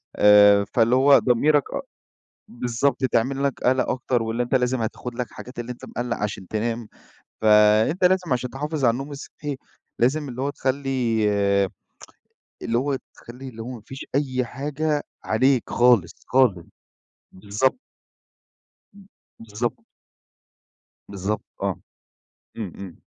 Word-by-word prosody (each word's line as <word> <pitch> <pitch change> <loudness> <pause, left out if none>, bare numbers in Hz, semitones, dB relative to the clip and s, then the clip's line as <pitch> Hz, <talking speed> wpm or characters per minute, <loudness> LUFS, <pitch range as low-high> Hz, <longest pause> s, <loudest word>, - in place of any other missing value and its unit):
آآ 105 -1 +7
فاللي 115 +1 +4
هو 140 +2 +6
ضميرك 145 +4 +3
أ - - -2 0.7
بالضبط، 125 +3 -1
تعمل 130 +3 +1
لك 140 -2 -1
قَلَق 130 +1 +2
أكتر 125 -1 0
واللي 115 +2 -1
أنت 120 - -2
لازم 125 -1 +1
هتاخُد 120 +2 -5
لك 125 +1 -3
حاجات 125 0 -11
اللي 120 +1 -4
أنت 120 - -13
مِقلَّق 120 -1 -3
عشان 100 -3 -4
تنام. 115 +1 -2 0.5
فأنت 110 - +4
لازم 180 -4 +3
عشان 125 0 -2
تحافظ 150 +1 -2
على 115 - +5
النوم 135 +5 -5
الصحّي، 145 0 -7 0.4
لازم 140 +4 +1
اللي 125 +1 -6
هو 140 - 0
تخلّي 130 -5 -1 1.4
اللي 115 - 0
هو 135 +2 0 0.2
تخلّي 125 +3 -11
اللي 115 -2 -9
هو 115 - -6
ما 120 -3 -8
فيش 135 - -8
أي 130 -3 0
حاجة 145 +4 -2 0.2
عليك 130 +2 +2
خالص، 120 -9 +4 0.2
خالص. 120 -10 +3 0.7
بالضبط. 105 - -1 1.1
ب 200 -1 -16 0.4
بالضبط. 110 +3 -3 1.2
بالضبط 100 +2 -3 0.2
آه. - - -2 0.8
إمم، 105 -6 -5
إمم. 95 -3 -10
125 Hz, 130 wpm, -23 LUFS, 110-135 Hz, 1.4 s, آآ